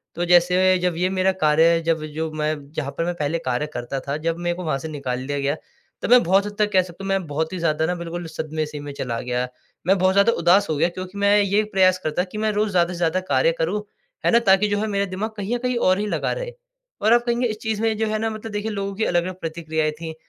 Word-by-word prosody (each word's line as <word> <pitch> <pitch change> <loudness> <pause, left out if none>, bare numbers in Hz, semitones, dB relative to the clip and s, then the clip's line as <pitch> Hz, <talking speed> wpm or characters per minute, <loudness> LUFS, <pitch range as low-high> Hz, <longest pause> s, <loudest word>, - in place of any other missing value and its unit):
तो 175 - -1
जैसे 180 +2 +4
जब 180 -2 0
ये 180 +1 +1
मेरा 190 0 +2
कार्य 160 +2 +5
जब 160 -2 +1
जो 160 +1 -3
मैं 155 0 -1 0.2
जहाँ 145 -4 -3
पर 165 - 0
मैं 175 - -1
पहले 150 +3 0
कार्य 130 +4 -1
करता 120 +3 -4
था 140 - -1
जब 165 +2 -2
मेको 175 +1 -2
वहाँ 155 -4 0
से 160 - -6
निकाल 130 -4 -4
दिया 145 0 -2
गया। 140 +1 0 0.5
तो - - -2
मैं 250 0 +8
बहुत 195 +4 +3
हद 205 - -6
तक 210 0 +2
कह 185 - +6
सकता 180 +1 -10
हूँ 195 - -4
मैं 195 -2 0
बहुत 160 +4 -2
ही 185 - -3
ज़्यादा 160 -1 +1
ना 180 +2 -1
बिल्कुल 170 0 -5
सदमे 155 -1 -3
से 150 -1 -7
में 145 0 -7
चला 120 -4 -3
गया। 125 0 -2 0.4
मैं 195 +1 +4
बहुत 185 +1 +3
ज़्यादा 200 +4 +5
उदास 190 +1 +4
हो 155 - 0
गया 165 - +2
क्योंकि 185 +2 -8
मैं 200 +1 +4
ये 200 +1 +2
प्रयास 185 -1 +4
करता 155 +3 0
कि 195 +3 -9
मैं 215 0 +1
रोज़ 210 0 0
ज़्यादा 175 0 +2
से - - -6
ज़्यादा 175 +1 +1
कार्य - - +3
करूँ, 210 - -1 0.4
है - - +4
ना? 235 - +6
ताकि 200 -2 +4
जो 205 0 0
है 220 - -1
मेरा 200 -1 0
दिमाग 195 +3 -3
कहीं 205 +4 -2
आ - - 0
कहीं 250 0 0
और 185 -4 +3
ही 210 - -1
लगा - - -1
रहे। - - -5 0.5
और 220 +2 +4
आप 240 0 +4
कहेंगे 240 0 +1
इस 215 -1 -4
चीज़ 220 -1 -2
में 220 -1 +1
जो 220 0 0
है 215 0 -1
ना 225 - 0
मतलब 220 0 -7
देखिए 210 +1 -3
लोगों 200 -1 -3
की 220 - 0
अलग-अलग 180 +1 -1
प्रतिक्रियाएँ 160 -2 -2
थीं। 160 -1 -5
180 Hz, 270 wpm, -22 LUFS, 160-205 Hz, 0.5 s, मैं